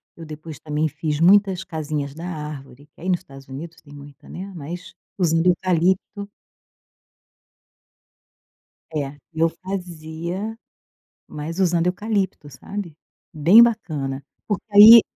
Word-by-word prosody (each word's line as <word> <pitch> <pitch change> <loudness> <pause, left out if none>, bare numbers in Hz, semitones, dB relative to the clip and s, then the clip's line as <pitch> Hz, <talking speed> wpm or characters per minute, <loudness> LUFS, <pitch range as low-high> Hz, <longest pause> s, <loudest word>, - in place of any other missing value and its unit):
eu 165 - -10
depois 155 -1 -9
também 150 +1 -1
fiz 150 0 -3
muitas 190 +1 +4
casinhas 150 -5 -4
da 165 +3 -9
árvore. 150 -5 -7
Que - - -19
aí 185 - -3
nos 180 -2 +1
Estados 135 0 -14
Unidos 160 +5 -8
tem 145 - -17
muita, 145 -1 -13
né, 195 +2 -7
mas 170 +3 -7 0.2
usando 165 -2 +2
eucalipto 185 +3 +1 2.7
É, 145 -1 -2 0.2
eu 165 0 +2
fazia, 175 +3 -5 0.7
mas 155 +4 -5
usando 175 -2 +2
eucalipto, 190 -4 -1
sabe. 170 +4 -7 0.4
Bem 170 +10 +7
bacana, 150 -12 0 0.2
porque 205 -2 -2
aí 215 +3 +11
165 Hz, 120 wpm, -22 LUFS, 150-190 Hz, 2.7 s, aí